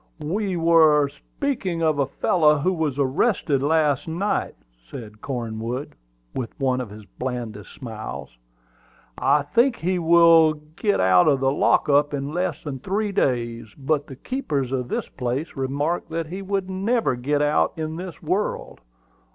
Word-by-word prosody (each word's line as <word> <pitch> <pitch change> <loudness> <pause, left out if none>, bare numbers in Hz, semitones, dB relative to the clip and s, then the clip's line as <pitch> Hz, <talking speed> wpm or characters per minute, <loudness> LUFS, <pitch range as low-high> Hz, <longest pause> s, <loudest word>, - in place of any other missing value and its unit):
"We 190 +4 -1
were 160 -3 +5
speaking 185 - -3
of 155 -2 +2
a 140 - +2
fellow 150 +1 +3
who 180 +6 +1
was 155 -5 -1
arrested 140 - +1
last 150 -1 +2
night," 175 +6 -1 0.3
said 105 -3 -9
Cornwood, 120 +1 -4 0.4
with 120 -3 -5
one 130 -2 +1
of 120 - -6
his 105 +1 -11
blandest 115 -1 -6
smiles. 110 - -8 0.8
"I 150 - +3
think 235 - +2
he 180 -1 -1
will 165 -1 +6 0.2
get 205 +2 +1
out 95 +3 +5
of 140 -3 +4
the 135 0 +2
lock 140 - +2
up 145 0 +3
in 140 +1 -4
less 180 +2 -2
than 140 -3 -5
three 205 +8 -1
days; 120 - -1
but 145 +1 -1
the 135 - -9
keeper 200 - -2
of 125 -1 -3
this - - -3
place 130 +5 -4
remarked 140 +5 -2
that 165 0 -2
he 180 +5 -6
would 195 -1 -2
never 195 - 0
get 145 +4 0
out 150 +1 +2
in 160 0 -3
this 180 -3 -8
world. 185 +6 -2
150 Hz, 155 wpm, -23 LUFS, 130-175 Hz, 0.8 s, will